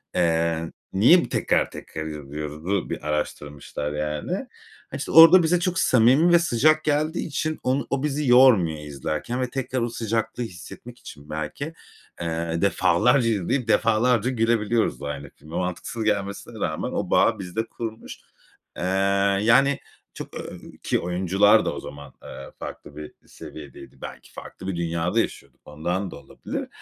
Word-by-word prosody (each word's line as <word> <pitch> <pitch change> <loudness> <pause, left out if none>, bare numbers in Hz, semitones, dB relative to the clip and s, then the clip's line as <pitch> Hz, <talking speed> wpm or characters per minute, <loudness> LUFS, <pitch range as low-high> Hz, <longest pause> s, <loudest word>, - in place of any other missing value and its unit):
Eee, 85 -1 +1 0.2
"Niye 120 - +5
bu - - -11
tekrar - - +1
tekrar 80 0 -7
izliyoruz?"u 75 +4 -4
bir 75 - -5
araştırmışlar, 75 -1 -4
yani. 75 0 -3 0.6
Hani, - - -4
işte, - - -5
orada 165 +4 +9
bize 170 +2 +2
çok 180 0 -1
samimi 130 +8 +4
ve 170 - +7
sıcak 155 0 +3
geldiği 155 +3 0
için 155 +1 -3
onu 130 +2 0
o 140 0 -1
bizi 150 -1 -1
yormuyor 120 -11 +5
izlerken 75 - -4
ve 125 - -1
tekrar 130 -1 -3
o 120 - -1
sıcaklığı 115 +1 -2
hissetmek 115 +4 -10
için 70 +1 -12
belki, 80 - -5 0.5
eee, 85 0 -2
defalarca 100 +6 +3
izleyip 115 +4 -1
defalarca 115 +1 +2
gülebiliyoruz 115 - +1
da 70 - -4
aynı 70 -1 -6
filme. 80 +3 -11
Mantıksız 90 +5 -3
gelmesine 105 +1 -2
rağmen 80 - -2
o - - -3
bağı 110 -2 +3
bizde 95 +4 -3
kurmuş. 115 -1 -7 0.6
Eee, - - -4 0.6
yani, 135 +6 +4 0.3
çok, - - -9
ööö, - - -7 0.2
ki - - +1
oyuncular 95 +3 +3
da - - -1
o - - -5
zaman, 70 -1 -10
eee, 65 - -10
farklı 75 - -9
bir 75 0 -9
seviyedeydi. 75 -4 -12
Belki - - -10
farklı 95 - -10
bir 95 - -2
dünyada 85 +4 -1
yaşıyorduk, - - -4
ondan 85 +5 -3
da - - -8
olabilir. 70 - -7
100 Hz, 150 wpm, -24 LUFS, 80-125 Hz, 0.6 s, orada